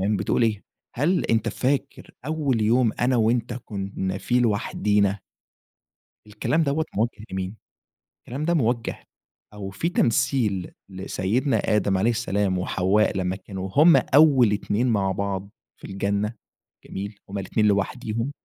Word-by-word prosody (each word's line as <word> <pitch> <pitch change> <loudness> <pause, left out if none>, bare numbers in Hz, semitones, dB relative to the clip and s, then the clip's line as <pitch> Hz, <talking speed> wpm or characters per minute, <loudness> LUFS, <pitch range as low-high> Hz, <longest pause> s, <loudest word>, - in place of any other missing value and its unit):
بتقول 100 +3 0
إيه؟ 110 -3 +1 0.3
هل 165 +8 +1
أنت 115 0 +1
فاكر 135 +4 -2 0.2
أوّل 145 -7 0
يوم 115 +1 +3
أنا 125 +1 +2
وأنت 115 +1 +1
كنّا 95 -2 -4
فيه 125 +4 +1
لوحدينا. 105 -2 +1 1.1
الكلام 105 +10 0
دوَّة 155 +2 0
موجه 110 -1 -1
لمين؟ 95 +2 -4 0.6
الكلام 140 +6 -5
ده 170 - +2
موجه 120 -6 -1 0.5
أو 100 -2 -6
في 130 - -2
تمثيل 110 - +1 0.2
لسيدنا 105 +7 -1 0.2
آدم 100 -2 +1
عليه 110 +5 +2
السلام 100 -5 0
وحواء 95 +3 +1
لمّا 95 0 -1
كانوا 95 0 -7
هم 165 +4 +7
أوّل 135 -7 +5
2 105 +4 0
مع 100 -4 +1
بعض 100 0 -3 0.3
في - - -9
الجنة 100 +3 -1 0.5
جميل؟ 100 +1 -6
همّ 100 - -4
الاتنين 105 +3 0
لوحديهم، 115 +4 -1
105 Hz, 130 wpm, -24 LUFS, 100-125 Hz, 1.1 s, هم